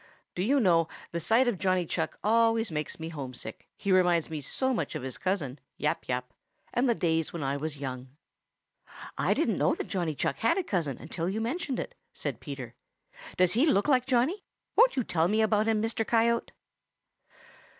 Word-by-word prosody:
Do 180 - -3
you 270 +9 +3
know, 170 -7 +4 0.2
the 170 - -2
sight 225 +9 +3
of 220 -7 0
Johnny 185 -2 +2
Chuck - - -2
always 225 -1 +3
makes 150 +1 -3
me 160 0 -5
homesick, 135 -6 -7
he 200 - -1
reminds 175 -3 +3
me 155 -2 -3
so 260 - -1
much 230 - -2
of - - -4
his 130 -1 -5
cousin, 155 -8 -1 0.2
Yap - - -1
Yap, 125 -1 -3 0.4
and 245 +1 +2
the 235 - +3
days 165 -4 0
when 165 -4 -4
I 135 +1 0
was 150 +1 -4
young." 130 -2 -5 1.1
"I - - +1
didn't - - +1
know - - +3
that - - -5
Johnny 175 -6 -1
Chuck - - -1
had 230 - +2
a 385 - +1
cousin 165 - -1
until 170 +2 -3
you 205 +3 -2
mentioned 265 +3 -2
it," - - -5 0.2
said - - -4
Peter. 135 -6 -7 0.6
"Does 180 -1 +4
he 255 +9 +4
look 205 -7 +3
like 255 -3 +3
Johnny? 270 - +2 0.3
Won't - - +6
you 255 - +1
tell 165 -5 +1
me 215 +3 +2
about 215 0 +2
him, 220 -1 +2
Mr. 225 0 0
Coyote?" 235 +1 +2
185 Hz, 190 wpm, -29 LUFS, 155-230 Hz, 1.1 s, Won't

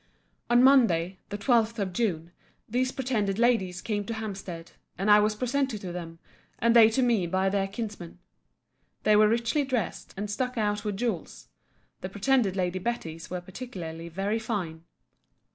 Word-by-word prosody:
On 240 +1 +5
Monday, 195 -10 +4
the 205 - -4
12th 230 0 +2
of 195 -3 -2
June, 175 -6 -1 0.4
these 255 +3 0
pretended 220 -8 -1
ladies 220 -7 +1
came 205 -2 -1
to 230 - -4
Hampstead; 195 -6 -6 0.3
and 195 +3 +2
I 210 - +8
was 210 0 +2
presented 255 0 -1
to 180 - -5
them, 170 -2 -7 0.4
and 235 +1 +2
they 225 -2 +8
to 260 +4 +1
me 225 -8 +2
by 190 +2 +1
their 195 0 0
kinsman. 200 -5 -6 0.9
They 215 - +5
were 215 0 +6
richly 235 +6 +1
dressed, 255 -7 -3
and 205 +2 -3
stuck 250 +4 -3
out 210 -1 0
with 205 -3 -3
jewels; 220 -7 -4 0.5
the 185 - -5
pretended 205 0 +1
Lady 185 -1 -1
Betty's 170 -7 -4
were 180 0 -4
particularly 175 -5 -7
very 195 +6 -1
fine. 180 -8 -4
210 Hz, 160 wpm, -27 LUFS, 185-235 Hz, 0.9 s, I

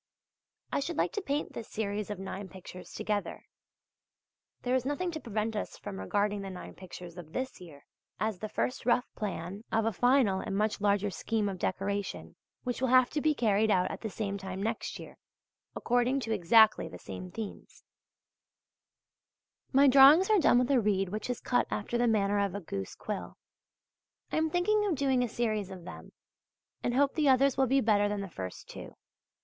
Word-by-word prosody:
I - - +1
should 315 +3 -3
like - - +1
to 410 - -2
paint 290 -4 -2
this 225 - -7
series 210 -1 -3
of 210 - -4
nine 190 +1 -6
pictures 185 -1 -11
together. 210 -1 -3 1.2
There 250 - 0
is 260 -1 +2
nothing 290 +7 -2
to 315 - -5
prevent 220 -3 -2
us 210 - -4
from 200 -2 -7
regarding 205 0 0
the 195 - -6
nine 185 -1 -8
pictures 180 -1 -10
of 160 -2 -11
this 260 -5 -4
year, 150 -5 -13 0.3
as 215 -4 -1
the 215 - -5
first 250 - -2
rough 245 0 +3
plan 195 0 -5
of 220 0 +2
a 225 - +1
final 245 -3 +3
and 195 0 -3
much 210 0 0
larger 205 0 +2
scheme 215 +4 -1
of 190 -2 -4
decoration 200 +2 -3 0.3
which 245 0 -3
will 260 - +2
have 255 0 +5
to 300 - -1
be 305 0 +2
carried 220 -3 +2
out 185 -3 +2
at - - -7
the 220 - -3
same 200 -1 -3
time 190 0 -5
next 225 +1 -3
year, - - -11 0.6
according 245 +3 +1
to 225 -2 -2
exactly 215 +3 +5
the - - -9
same 185 - -8
themes. 210 +3 -8 1.9
My 275 +1 +6
drawings 280 +9 +8
are 425 - +5
done 265 - +5
with 250 +2 +2
a 260 -3 +4
reed 195 -3 +1
which 215 +5 -4
is 245 - -2
cut 245 - +1
after 225 +3 -2
the 240 - +3
manner 205 -2 +2
of 200 -1 0
a - - -2
goose 100 - -6
quill. 210 -2 -6 0.9
I - - 0
am 320 0 +2
thinking 420 +6 +2
of 365 - +1
doing 265 -2 +2
a 245 - 0
series 215 -4 -1
of 185 -2 -9
them, - - -10 0.7
and 240 - -1
hope 280 +1 +3
the 300 -3 +2
others 265 +1 +4
will 265 -1 +2
be 270 +2 +3
better 205 -2 +3
than 205 -1 -2
the 195 - -6
first 95 - -7
two. - - -10
215 Hz, 195 wpm, -30 LUFS, 200-255 Hz, 1.9 s, drawings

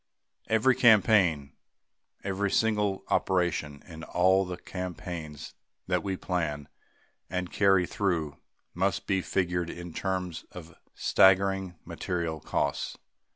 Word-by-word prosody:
Every 110 +4 +4
campaign, 100 - +4 0.7
every 100 +1 -1
single 105 -2 +1
operation 85 -6 0
in 80 -2 -10
all 95 +3 +3
the 90 -1 -5
campaigns 85 -4 -6 0.3
that 90 -1 0
we 95 -2 -3
plan 75 -7 -2 0.6
and 90 0 -3
carry 95 -3 +4
through 85 -7 -1 0.4
must 95 0 0
be 95 -1 +1
figured 90 -2 -1
in 85 -1 -8
terms 90 -2 -3
of 90 -1 -10 0.2
staggering 95 -1 +3
material 85 -3 -3
costs. - - -2
90 Hz, 110 wpm, -28 LUFS, 85-95 Hz, 0.7 s, Every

